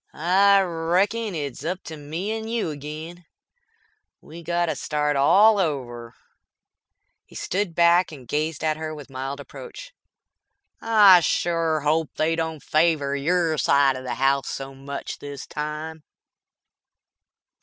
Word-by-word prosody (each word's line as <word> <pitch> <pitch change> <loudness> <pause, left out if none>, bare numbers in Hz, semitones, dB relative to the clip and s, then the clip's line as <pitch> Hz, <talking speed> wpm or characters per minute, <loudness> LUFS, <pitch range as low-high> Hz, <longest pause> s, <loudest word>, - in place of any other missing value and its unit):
"I 195 +4 +4
reckon 185 +5 0
it's 140 -3 -5
up 180 +3 -3
to 160 +1 -8
me 160 +7 -5
and 220 0 -4
you 230 -8 -1
agin. 155 +4 -8 1.0
We 170 +2 -12
got 175 +1 0
to 160 - -2
start 150 -1 -1
all 200 +10 +5
over." 120 -8 -3 1.1
He - - -19
stood 190 -3 -2
back 170 +1 +4
and 135 -6 -12
gazed 155 +3 -2
at 155 -1 0
her 155 0 -5
with 145 -2 -11
mild 135 +2 -5
reproach. - - -11 0.9
"I 210 -5 +7
shore 165 -2 0
hope 155 +1 0
they 160 +1 +1
don't 160 -2 -4
favor 155 -3 +1
your 160 +1 0
side 140 -1 +3
of 130 - -7
the 130 - -4
house 135 +1 +1
so 135 0 -6
much 140 +1 -7
this 145 -1 -8
time." 150 +1 -6
160 Hz, 135 wpm, -23 LUFS, 145-175 Hz, 1.1 s, I